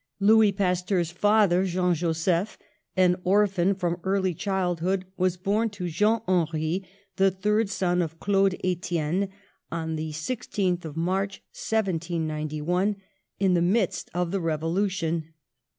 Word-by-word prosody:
Louis 215 Hz, +1 st, +5 dB
Pasteur's 180 Hz, -2 st, 0 dB
father, 200 Hz, -1 st, +3 dB
Jean 180 Hz, -1 st, +1 dB
Joseph, 170 Hz, +4 st, 0 dB, 0.4 s
an 180 Hz, -1 st, +4 dB
or 205 Hz, +3 st, +4 dB
phan 195 Hz, 0 st, +1 dB
from 175 Hz, -2 st, -2 dB
early 190 Hz, -1 st, +1 dB
childhood, 185 Hz, 0 st, -1 dB
was 185 Hz, -1 st, 0 dB
born 210 Hz, +5 st, 0 dB
to 180 Hz, -2 st, -3 dB
Jean 210 Hz, +7 st, +2 dB
Henri, 170 Hz, 0 st, 0 dB, 0.3 s
the 195 Hz, -1 st, +5 dB
third 210 Hz, +3 st, 0 dB
son 180 Hz, -3 st, +1 dB
of 165 Hz, -1 st, -4 dB
Claude 195 Hz, -2 st, +2 dB
Etienne, 180 Hz, 0 st, -1 dB, 0.4 s
on 160 Hz, -1 st, -3 dB
the 155 Hz, 0 st, -3 dB
16th 180 Hz, +1 st, -2 dB
of 155 Hz, 0 st, -7 dB
March, 190 Hz, +4 st, -1 dB
1791, 170 Hz, -2 st, -1 dB, 0.4 s
in 190 Hz, -2 st, +3 dB
the 175 Hz, -, +3 dB
midst 190 Hz, +2 st, +1 dB
of 175 Hz, -1 st, 0 dB
the 195 Hz, -, 0 dB
Revo 165 Hz, 0 st, -1 dB
lution. 170 Hz, -5 st, -1 dB
180 Hz, 135 wpm, -26 LUFS, 170-195 Hz, 0.4 s, Louis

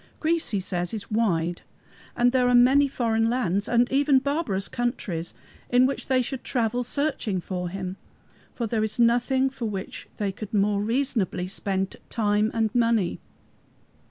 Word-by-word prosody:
Greece, 330 Hz, +1 st, 0 dB
he 205 Hz, -, 0 dB
says, 180 Hz, +1 st, -3 dB
is 215 Hz, -, -8 dB
wide, 175 Hz, -6 st, 0 dB, 0.6 s
and 245 Hz, 0 st, +4 dB
there 250 Hz, -1 st, +3 dB
are 245 Hz, -, +4 dB
many 265 Hz, +4 st, +6 dB
foreign 225 Hz, -4 st, 0 dB
lands 205 Hz, -5 st, 0 dB
and 240 Hz, +1 st, +3 dB
even 280 Hz, 0 st, +4 dB
barbarous 270 Hz, -, -1 dB
countries 195 Hz, -9 st, -3 dB, 0.3 s
in 250 Hz, +1 st, +5 dB
which 275 Hz, -, -2 dB
they 255 Hz, -1 st, +2 dB
should 265 Hz, +1 st, -5 dB
travel 245 Hz, 0 st, 0 dB
searching 250 Hz, -7 st, -1 dB
for 180 Hz, 0 st, -4 dB
Him, 185 Hz, 0 st, -5 dB, 0.6 s
for 235 Hz, -, -2 dB
there 220 Hz, -1 st, 0 dB
is 220 Hz, +2 st, -2 dB
nothing 245 Hz, +3 st, +3 dB
for 260 Hz, -3 st, -5 dB
which 195 Hz, -2 st, -6 dB
they 205 Hz, -2 st, -1 dB
could 210 Hz, +2 st, -7 dB
more 200 Hz, 0 st, +2 dB
reasonably 220 Hz, -6 st, 0 dB
spend 190 Hz, 0 st, -3 dB
time 210 Hz, -1 st, +1 dB
and 225 Hz, -1 st, 0 dB
money. 230 Hz, -6 st, +1 dB
230 Hz, 155 wpm, -25 LUFS, 195-250 Hz, 0.6 s, many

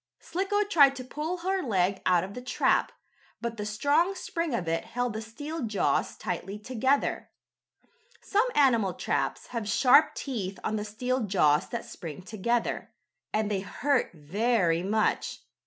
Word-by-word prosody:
Slicko 395 Hz, +3 st, -1 dB
tried 290 Hz, -9 st, +5 dB
to 255 Hz, -, -6 dB
pull 305 Hz, +7 st, -4 dB
her 380 Hz, 0 st, +1 dB
leg 195 Hz, -, +1 dB
out 180 Hz, -2 st, +4 dB
of 195 Hz, +2 st, -7 dB
the 250 Hz, -, -7 dB
trap, 250 Hz, -, +1 dB, 0.5 s
but 235 Hz, -1 st, -4 dB
the 210 Hz, 0 st, -3 dB
strong 290 Hz, -, +2 dB
spring 335 Hz, -6 st, -2 dB
of 180 Hz, -7 st, -3 dB
it 165 Hz, 0 st, 0 dB
held 245 Hz, -1 st, -2 dB
the 220 Hz, -, -4 dB
steel 290 Hz, +9 st, -6 dB
jaws 215 Hz, -5 st, 0 dB
tightly 185 Hz, +3 st, -4 dB
together. 260 Hz, +5 st, 0 dB, 0.9 s
Some 425 Hz, +4 st, +1 dB
animal 230 Hz, -9 st, +3 dB
traps -, -, -1 dB
have 230 Hz, -4 st, -3 dB
sharp 255 Hz, +6 st, +5 dB
teeth 200 Hz, -8 st, -4 dB
on 215 Hz, -, -1 dB
the 210 Hz, -1 st, -2 dB
steel 250 Hz, +5 st, -1 dB
jaws 150 Hz, -7 st, +3 dB
that 235 Hz, -, -4 dB
spring 165 Hz, -1 st, -8 dB
together, 225 Hz, +4 st, -1 dB, 0.4 s
and 215 Hz, -1 st, 0 dB
they 200 Hz, -, +1 dB
hurt 265 Hz, +7 st, 0 dB
very 175 Hz, +2 st, +1 dB
much. 210 Hz, +4 st, 0 dB
230 Hz, 155 wpm, -28 LUFS, 195-280 Hz, 0.9 s, tried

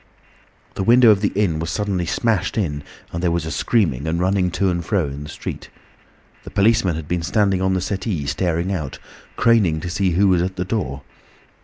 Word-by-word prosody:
The -, -, -4 dB
window 120 Hz, +2 st, +6 dB
of 100 Hz, -1 st, +2 dB
the 100 Hz, -, +1 dB
inn 95 Hz, -6 st, +1 dB
was 80 Hz, 0 st, -3 dB
suddenly 95 Hz, -1 st, -1 dB
smashed 115 Hz, +3 st, 0 dB
in, 75 Hz, -9 st, -1 dB, 0.3 s
and 85 Hz, -, -3 dB
there 90 Hz, -, +2 dB
was 85 Hz, -1 st, -1 dB
a 80 Hz, -, -4 dB
screaming 80 Hz, -, 0 dB
and 85 Hz, +1 st, -1 dB
running 95 Hz, 0 st, +1 dB
to 95 Hz, -1 st, +1 dB
and 85 Hz, -1 st, -2 dB
fro 95 Hz, -1 st, 0 dB
in 70 Hz, 0 st, -6 dB
the 75 Hz, -, -8 dB
street. -, -, -7 dB, 0.7 s
The -, -, -9 dB
policeman 100 Hz, -4 st, +2 dB
had 80 Hz, -2 st, -6 dB
been 90 Hz, 0 st, -1 dB
standing 95 Hz, +3 st, +1 dB
on 95 Hz, 0 st, +1 dB
the 95 Hz, -, 0 dB
settee 95 Hz, -5 st, -3 dB
staring 85 Hz, +4 st, -1 dB
out, 75 Hz, -8 st, -4 dB, 0.4 s
craning 100 Hz, -9 st, +3 dB
to 90 Hz, -, -4 dB
see 95 Hz, +1 st, +1 dB
who 100 Hz, +4 st, +3 dB
was 90 Hz, -2 st, +3 dB
at 95 Hz, +1 st, -2 dB
the 90 Hz, -, -3 dB
door. 80 Hz, -, -3 dB
90 Hz, 205 wpm, -21 LUFS, 80-100 Hz, 0.7 s, window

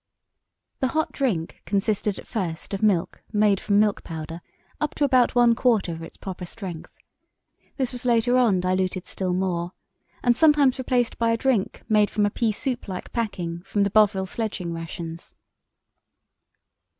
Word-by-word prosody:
The 260 Hz, -, +2 dB
hot 315 Hz, +4 st, -1 dB
drink 200 Hz, -, -2 dB
consisted 200 Hz, +1 st, 0 dB
at -, -, -9 dB
first 180 Hz, -6 st, -4 dB
of 195 Hz, -, -2 dB
milk 200 Hz, -6 st, +1 dB
made 210 Hz, -2 st, +3 dB
from 205 Hz, -1 st, +2 dB
milk 210 Hz, -1 st, +2 dB
powder 165 Hz, 0 st, -6 dB, 0.4 s
up 300 Hz, -, -2 dB
to -, -, 0 dB
about 255 Hz, -4 st, +3 dB
one 240 Hz, -1 st, +6 dB
quarter 225 Hz, -7 st, +2 dB
of 165 Hz, 0 st, -6 dB
its 165 Hz, -, -10 dB
proper 185 Hz, -2 st, -7 dB
strength. 180 Hz, -3 st, -8 dB, 0.8 s
This 260 Hz, -4 st, 0 dB
was 245 Hz, -1 st, -6 dB
later 245 Hz, 0 st, +3 dB
on 225 Hz, -8 st, +4 dB
diluted 185 Hz, 0 st, -1 dB
still 185 Hz, -2 st, -2 dB
more, 180 Hz, -1 st, -1 dB, 0.5 s
and 245 Hz, -1 st, +4 dB
sometimes 290 Hz, -3 st, +4 dB
replaced 245 Hz, -2 st, 0 dB
by 230 Hz, -1 st, +2 dB
a 230 Hz, -, +2 dB
drink 235 Hz, -5 st, 0 dB
made 210 Hz, -1 st, +4 dB
from 210 Hz, -1 st, +1 dB
a 205 Hz, -, 0 dB
pea 225 Hz, 0 st, +1 dB
soup 245 Hz, +3 st, -3 dB
like 185 Hz, -2 st, -6 dB
packing 175 Hz, -7 st, -3 dB
from 200 Hz, +1 st, 0 dB
the 200 Hz, -, 0 dB
Bovril 200 Hz, -3 st, +4 dB
sledging 190 Hz, -4 st, -3 dB
rations. 165 Hz, 0 st, -7 dB
205 Hz, 160 wpm, -24 LUFS, 180-240 Hz, 0.8 s, one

